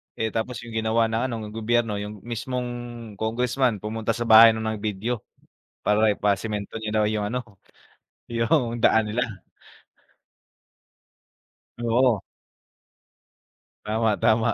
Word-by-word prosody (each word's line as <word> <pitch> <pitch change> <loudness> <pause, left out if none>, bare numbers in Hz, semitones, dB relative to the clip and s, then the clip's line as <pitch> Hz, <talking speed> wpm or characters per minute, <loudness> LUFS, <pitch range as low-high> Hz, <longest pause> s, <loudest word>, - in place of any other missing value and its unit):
eh, 110 -1 -2
tapos 115 +2 -3
yung 120 - -9
ginawa 110 0 +1
ng 115 +1 0
ano 125 - -4
ng 105 - -7
gobyerno 115 -1 0
yung 105 -1 -7
mismong 120 +2 -3 0.5
Congressman 120 0 0
pumunta 110 +1 -2
sa 120 - -2
bahay 115 0 +8
nung 110 - -4
nag-video 110 +1 -2 0.6
para 105 0 +3
ipasemento 105 +1 -2
niya 110 -1 -4
daw 110 0 +3
yung 105 -1 -1
ano 125 +4 -2 0.8
yung 120 0 0
daan 110 0 +4
nila. 125 +3 +1 2.6
Oo. 120 -2 +2 1.6
Tama, 110 +1 +1
tama 110 +1 +3
110 Hz, 115 wpm, -24 LUFS, 110-120 Hz, 2.6 s, bahay